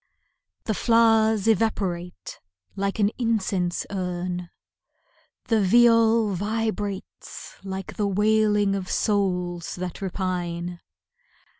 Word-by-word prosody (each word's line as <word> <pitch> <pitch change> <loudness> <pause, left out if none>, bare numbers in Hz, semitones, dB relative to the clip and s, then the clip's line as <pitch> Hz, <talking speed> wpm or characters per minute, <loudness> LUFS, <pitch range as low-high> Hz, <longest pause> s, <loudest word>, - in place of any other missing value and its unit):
The 220 - -1
flowers 225 -2 +3
evaporate 190 -5 -1 0.4
like 195 0 -2
an 205 -2 +3
incense 200 -6 0
urn, 180 -2 -3 1.0
The 225 -2 +2
viol 230 0 +4
vibrates 205 0 -4
like 190 -1 -6
the 205 - +1
wailing 210 0 +2
of 190 -2 -4
souls 180 -5 -1
that 180 0 -6
repine. 175 -2 -3
200 Hz, 90 wpm, -24 LUFS, 180-220 Hz, 1.0 s, viol